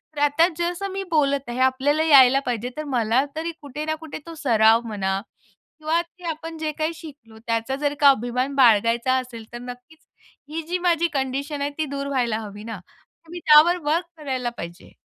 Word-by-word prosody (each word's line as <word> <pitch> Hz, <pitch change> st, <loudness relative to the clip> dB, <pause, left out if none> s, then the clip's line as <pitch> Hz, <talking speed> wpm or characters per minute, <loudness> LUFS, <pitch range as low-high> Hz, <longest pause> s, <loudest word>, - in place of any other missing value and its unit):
तर -, -, -5 dB
आता 290 Hz, +4 st, +4 dB
जसं 350 Hz, +3 st, -2 dB
मी 390 Hz, 0 st, -3 dB
बोलत 280 Hz, -4 st, +1 dB
आहे, 240 Hz, +2 st, -4 dB
आपल्याला 270 Hz, +4 st, +2 dB
यायला 275 Hz, -4 st, +7 dB
पाहिजे. 245 Hz, 0 st, -2 dB
तर 305 Hz, -, -3 dB
मला 235 Hz, +3 st, +2 dB
तरी 330 Hz, +2 st, -3 dB
कुठे 295 Hz, +1 st, -6 dB
ना 315 Hz, 0 st, -1 dB
कुठे 315 Hz, -1 st, -7 dB
तो 330 Hz, -1 st, -9 dB
सराव 225 Hz, -2 st, +5 dB
म्हणा 195 Hz, -2 st, -2 dB, 0.6 s
किंवा 320 Hz, +2 st, +1 dB
ते 355 Hz, +1 st, -18 dB
आपण 325 Hz, +1 st, -6 dB
जे 310 Hz, -1 st, -2 dB
काही 315 Hz, +2 st, -2 dB
शिकलो, 280 Hz, -9 st, -13 dB
त्याचा 230 Hz, +3 st, -1 dB
जर 290 Hz, -1 st, 0 dB
का 285 Hz, -1 st, +7 dB
अभिमान 255 Hz, +2 st, 0 dB
बाळगायचा 235 Hz, 0 st, +4 dB
असेल, 235 Hz, -3 st, -9 dB
तर 240 Hz, -, -6 dB
नक्कीच 250 Hz, +6 st, -11 dB, 0.5 s
ही 330 Hz, -, -2 dB
जी 360 Hz, +1 st, -1 dB
माझी 340 Hz, 0 st, +3 dB
कंडिशन 275 Hz, +2 st, -2 dB
आहे 285 Hz, -, 0 dB
ती 310 Hz, -, 0 dB
दूर 280 Hz, 0 st, -3 dB
व्हायला 245 Hz, -5 st, 0 dB
हवी 205 Hz, +1 st, -10 dB
ना. 225 Hz, -4 st, -7 dB, 0.5 s
मी 350 Hz, -, -7 dB
त्यावर 310 Hz, +4 st, +7 dB
वर्क 340 Hz, +3 st, +1 dB
करायला 260 Hz, -5 st, -3 dB
पाहिजे. 170 Hz, +1 st, -9 dB
275 Hz, 185 wpm, -23 LUFS, 240-315 Hz, 0.6 s, यायला